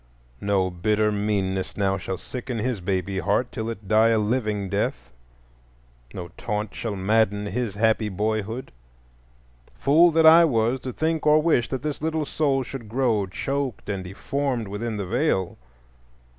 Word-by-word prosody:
No 95 -2 +1
bitter 105 +4 +1
meanness 100 -2 -1
now 95 -1 +1
shall 95 0 -4
sicken 125 +2 -6
his 115 -2 -2
baby 95 +1 -1
heart 105 +6 0
till 110 -2 -4
it 110 -3 -7
die 110 +2 +5
a 115 -1 +3
living 105 -2 0
death, 95 -11 -2 1.0
no 85 +5 -7
taunt 105 0 -3
shall 110 -3 -4
madden 105 +1 +1
his 105 0 -3
happy 110 0 +2
boyhood. 110 +4 -2 1.0
Fool 160 +5 +5
that 160 0 +3
I 165 +2 +9
was 120 -4 +2
to 130 - -5
think 160 +2 -1
or 150 +1 +6
wish 155 -7 +2
that 130 -1 -4
this 150 -1 -3
little 160 -1 -1
soul 140 -3 0
should 120 -3 -8
grow 115 -5 +1
choked 135 +3 -3
and 100 -2 -2
deformed 120 +4 -3
within 110 +2 -3
the 100 - -3
Veil! 115 - 0
110 Hz, 155 wpm, -24 LUFS, 100-130 Hz, 1.0 s, I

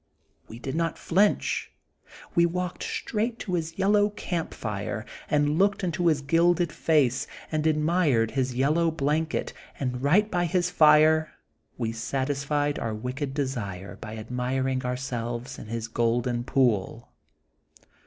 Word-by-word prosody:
We 115 - -9
did 130 +2 -5
not 165 +1 -1
flinch. 200 +4 +1 0.6
We 170 0 +4
walked 180 +1 -3
straight 225 +2 -2
to 185 - -4
his 165 -1 -2
yellow 205 +1 +3
campfire, 115 - -4 0.2
and 150 +2 +2
looked 200 +1 +2
into 175 -1 0
his 150 -3 +2
gilded 170 +3 +3
face 145 -5 +2 0.2
and 155 0 +1
admired 150 -7 +2
his 130 -2 -1
yellow 155 +6 +2
blanket, 155 +1 -1 0.3
and 125 -2 -2
right 190 +10 +3
by 175 -1 +1
his 180 0 0
fire 155 0 +5 0.5
we 115 -2 -1
satisfied 140 +5 -1
our 110 -1 -2
wicked 130 +5 -4
desire 100 -10 -3
by 110 0 -8
admiring 130 +3 -1
ourselves 125 0 -4
in - - -9
his 115 0 -4
golden 120 +1 0
pool. 125 -9 +1
145 Hz, 130 wpm, -26 LUFS, 125-165 Hz, 0.6 s, fire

